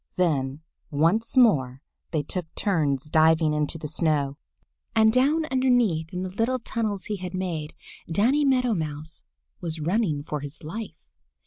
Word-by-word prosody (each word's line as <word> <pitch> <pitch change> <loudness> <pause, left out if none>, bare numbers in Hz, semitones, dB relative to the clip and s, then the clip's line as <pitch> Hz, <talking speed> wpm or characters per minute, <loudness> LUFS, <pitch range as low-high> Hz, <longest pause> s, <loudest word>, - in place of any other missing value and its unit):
Then 145 -5 0 0.3
once 170 - +1
more 135 - +4 0.3
they 155 -3 -1
took 175 +3 -1
turns 150 -9 +1
diving 160 0 +4
into 150 +2 0
the 155 - -5
snow. 150 -2 0 0.6
And 220 0 +5
down 290 +6 +3
underneath 245 -12 +2
in 180 0 -3
the 185 - -4
little 225 +6 0
tunnels 220 -4 -3
he 210 - -3
had 185 0 -6
made, 170 -5 -3 0.4
Danny 245 - +3
Meadow 255 -4 +3
Mouse 155 - -4 0.4
was 165 -2 -4
running 165 -3 0
for 150 -1 -4
his 145 +3 -9
life. 170 +1 -6
170 Hz, 145 wpm, -25 LUFS, 150-220 Hz, 0.6 s, And